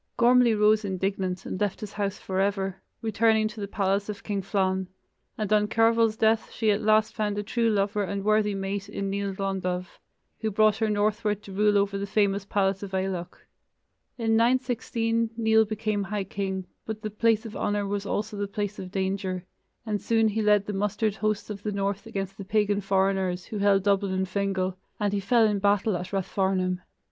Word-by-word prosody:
Gormlai 240 -1 +5
rose 215 +1 +4
indignant 190 -1 -2
and 185 - -5
left 205 -2 0
his 210 -3 -7
house 200 -1 -2
forever, 195 0 -1 0.2
returning 220 0 +3
to 215 -1 -9
the 200 - -3
palace 200 +1 0
of 210 - -6
King 200 -2 -2
Flann, 190 -1 0 0.5
and 215 -1 0
on 210 0 +3
Cearbhail's 225 0 +3
death 220 0 +2
she 220 -2 +1
at 205 - 0
last 215 0 +3
found 210 -2 -1
a 205 - -1
true 230 +2 +1
lover 205 0 +1
and 200 0 -3
worthy 215 -1 +2
mate 195 +1 -3
in 200 -1 -3
Nial 200 0 -2
Glondubh, 190 -2 -2 0.5
who 220 - -1
brought 215 0 +3
her 220 -1 0
northward 210 0 0
to 195 - -10
rule 205 +1 +3
over 200 0 +1
the 200 - -3
famous 200 -1 +1
palace 195 -1 0
of 195 -2 -5
Aileach. 185 -2 -3 0.7
In 225 -2 +1
916 230 -1 +1
Nial 220 -1 +4
became 215 -1 -2
high 205 +1 -2
king, 190 -1 -3 0.2
but 220 -1 -5
the 215 - -3
place 225 +1 +2
of 220 - -7
honor 205 0 -1
was 200 0 -2
also 210 +1 -2
the 205 0 -2
place 205 +1 -4
of 185 - -6
danger, 190 -1 -2 0.4
and 210 -2 -2
soon 225 -1 +2
he 220 +1 -1
led 210 -1 +4
the 210 - -4
mustered 210 +2 0
hosts 215 +1 -1
of 200 -1 -6
the 210 - -2
north 200 +1 -2
against 195 -3 -5
the - - -4
pagan 205 0 +1
foreigners, 190 -2 +1
who 210 - -5
held 200 -1 +3
Dublin 200 -1 +2
and 190 0 0
Fingal, 190 -1 -1 0.2
and 205 -1 0
he 200 - +1
fell 225 +4 +4
in 210 -2 +1
battle 205 0 +2
at 180 +1 -5
Rathfarnham. 190 -1 0
205 Hz, 190 wpm, -26 LUFS, 195-215 Hz, 0.7 s, Gormlai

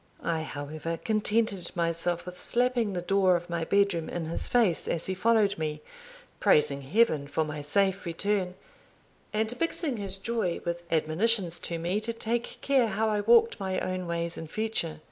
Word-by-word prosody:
I 165 -1 -1
however 155 +2 -5
contented 215 -1 0
myself 170 0 0
with 180 0 -7
slapping 245 -4 +2
the 175 -1 -3
door 190 -1 +3
of 175 0 -4
my 170 -1 -1
bedroom 200 -4 +1
in 170 -2 -4
his 165 - -2
face 220 -9 +2
as 165 - -1
he 190 - -1
followed 205 0 +2
me, 150 -1 -3 0.6
praising 140 -2 +3
Heaven 155 - +2
for 155 +2 -1
my 150 -1 -5
safe 190 +6 +2
return, 185 +2 -1 0.8
and 220 +2 0
mixing 325 -5 0
his 195 -2 0
joy 200 -4 -1
with 170 0 -2
admonitions 175 +4 +1
to 170 - -2
me 175 +5 -1
to 225 +2 -4
take 230 +1 -3
care 270 -4 +3
how 220 +1 0
I 210 -1 0
walked 230 +1 +4
my 190 -1 -2
own 185 -1 -3
ways 170 0 -2
in 160 - -7
future. 215 -4 -3
185 Hz, 170 wpm, -28 LUFS, 165-220 Hz, 0.8 s, walked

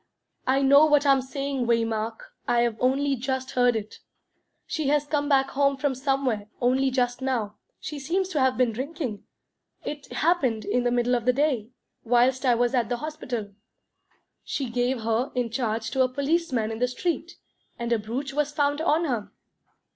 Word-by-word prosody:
"I 270 +1 +3
know 280 +3 +7
what 295 -1 +4
I'm 275 -1 +5
saying, 270 -1 -3
Waymark 225 -1 0 0.3
I've 235 -1 +2
only 275 +2 +2
just 260 +1 -3
heard 245 -1 +3
it. 215 -1 -5 0.7
She 315 -5 -2
has 295 +1 +2
come 290 0 -1
back 270 -1 +3
home 275 0 +2
from 285 -1 0
somewhere 260 -5 -1
only 260 +2 +2
just 250 -1 0
now 235 -6 -2 0.2
she 300 -2 -6
seems 360 +7 -1
to 320 -6 -1
have 260 -1 +2
been 250 -2 +3
drinking. 260 - -4 0.6
It 295 -1 -6
happened 275 -10 +1
in 245 +4 0
the 245 - +2
middle 245 0 +1
of 240 -2 0
the 250 - +4
day, 260 -6 0 0.3
whilst 250 +3 +2
I 245 - +5
was 245 +1 +1
at 240 -4 +1
the 245 - -1
hospital. 245 -8 -5 0.9
She 265 -4 -3
gave 245 0 0
her 225 +3 0
in 245 -2 -1
charge 225 -2 -2
to 265 - +1
a 255 - +3
policeman 280 -4 0
in 220 - -5
the 250 - +2
street, 340 +6 -3 0.4
and 235 0 -1
a 230 - +1
brooch 255 +6 -4
was 295 0 0
found 290 0 0
on 325 0 +2
her." 240 -8 -2
260 Hz, 175 wpm, -26 LUFS, 235-285 Hz, 0.9 s, know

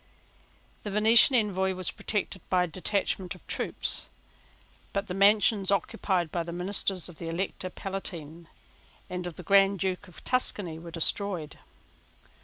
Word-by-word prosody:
The 210 - -5
Venetian 220 +6 +6
Envoy 190 -4 +1
was 185 -1 -3
protected 205 -2 -2
by 180 -1 +3
a - - -1
detachment 185 +1 -1
of 180 - -18
troops: - - -1 0.8
but 200 0 -1
the 180 - -5
mansions 200 0 +4
occupied 190 -4 0
by 175 - -1
the 170 0 -5
ministers 185 +1 -1
of 175 -3 -13
the 165 - -5
Elector 185 +2 -3
Palatine 170 -4 -6 0.6
and 180 0 -3
of 170 - -7
the 180 - -9
Grand 195 +2 +5
Duke 190 +2 -2
of 180 - -13
Tuscany 200 -10 -1
were 170 +1 -9
destroyed. 165 -1 0
190 Hz, 145 wpm, -28 LUFS, 175-200 Hz, 0.8 s, Venetian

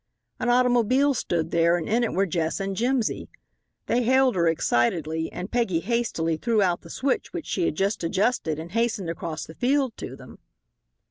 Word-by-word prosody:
An 245 - 0
automobile 250 +3 +3
stood 165 -8 -2
there, 170 +1 +3
and 165 - -4
in 235 +3 +2
it 230 - 0
were 195 +2 +2
Jess 165 -2 -1
and 195 0 -3
Jimsy. 240 +1 -1 0.6
They 245 - +1
hailed 260 0 +3
her 170 -2 +2
excitedly, 160 +2 0
and 180 +3 -6
Peggy 230 -9 +1
hastily 170 -7 -1
threw 230 +4 +1
out 180 -3 +2
the - - -14
switch 270 -1 -2
which 345 -4 -5
she 180 - -1
had - - -1
just 195 +2 -1
adjusted 165 - 0
and 165 +2 -7
hastened 225 -5 0
across 160 -2 -5
the 160 - -11
field 260 - +1
to - - -7
them. - - -14
195 Hz, 185 wpm, -25 LUFS, 165-245 Hz, 0.6 s, automobile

